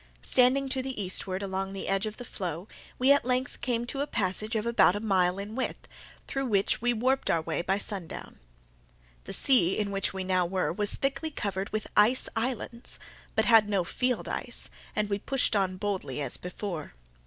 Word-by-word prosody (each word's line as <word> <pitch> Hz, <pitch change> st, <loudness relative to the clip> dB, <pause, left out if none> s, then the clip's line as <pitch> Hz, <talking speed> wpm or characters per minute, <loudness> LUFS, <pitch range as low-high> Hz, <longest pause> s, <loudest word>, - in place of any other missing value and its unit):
Standing 260 Hz, +2 st, +4 dB
to 260 Hz, 0 st, 0 dB
the 260 Hz, -3 st, -5 dB
eastward 190 Hz, 0 st, 0 dB
along 195 Hz, 0 st, -3 dB
the 195 Hz, -, -5 dB
edge 195 Hz, +2 st, +1 dB
of 215 Hz, -, -6 dB
the 245 Hz, -, -8 dB
floe, 180 Hz, -3 st, -5 dB, 0.3 s
we 260 Hz, +2 st, +4 dB
at 285 Hz, -, +5 dB
length 250 Hz, 0 st, -1 dB
came 240 Hz, -2 st, 0 dB
to 275 Hz, +3 st, -3 dB
a 290 Hz, -, -1 dB
passage 215 Hz, 0 st, -1 dB
of 215 Hz, 0 st, 0 dB
about 235 Hz, -5 st, +4 dB
a -, -, -1 dB
mile 190 Hz, -4 st, +2 dB
in 200 Hz, +2 st, -5 dB
width, 260 Hz, +2 st, -3 dB, 0.4 s
through 270 Hz, -1 st, -2 dB
which 200 Hz, -2 st, +1 dB
we 245 Hz, +1 st, +2 dB
warped 255 Hz, +4 st, +1 dB
our 165 Hz, -1 st, +2 dB
way 165 Hz, +1 st, -1 dB
by 190 Hz, +3 st, +1 dB
sundown. 195 Hz, -4 st, -5 dB, 0.9 s
The -, -, -5 dB
sea 215 Hz, -10 st, +4 dB
in 205 Hz, -1 st, -1 dB
which 195 Hz, 0 st, 0 dB
we 190 Hz, -1 st, -4 dB
now 185 Hz, -1 st, +1 dB
were 185 Hz, -1 st, 0 dB
was 205 Hz, +2 st, 0 dB
thickly 275 Hz, +3 st, -1 dB
covered 200 Hz, -, -3 dB
with 215 Hz, 0 st, -2 dB
ice 220 Hz, +5 st, +5 dB
islands, 235 Hz, +1 st, -1 dB, 0.4 s
but -, -, +3 dB
had 225 Hz, -3 st, +6 dB
no 195 Hz, -3 st, +2 dB
field 250 Hz, +7 st, -1 dB
ice, -, -, -2 dB, 0.2 s
and 210 Hz, 0 st, +1 dB
we 200 Hz, 0 st, -1 dB
pushed 270 Hz, -1 st, +1 dB
on 190 Hz, -2 st, +1 dB
boldly 185 Hz, -9 st, -3 dB
as 140 Hz, -4 st, 0 dB
before. 180 Hz, -, -6 dB
205 Hz, 195 wpm, -28 LUFS, 190-245 Hz, 0.9 s, had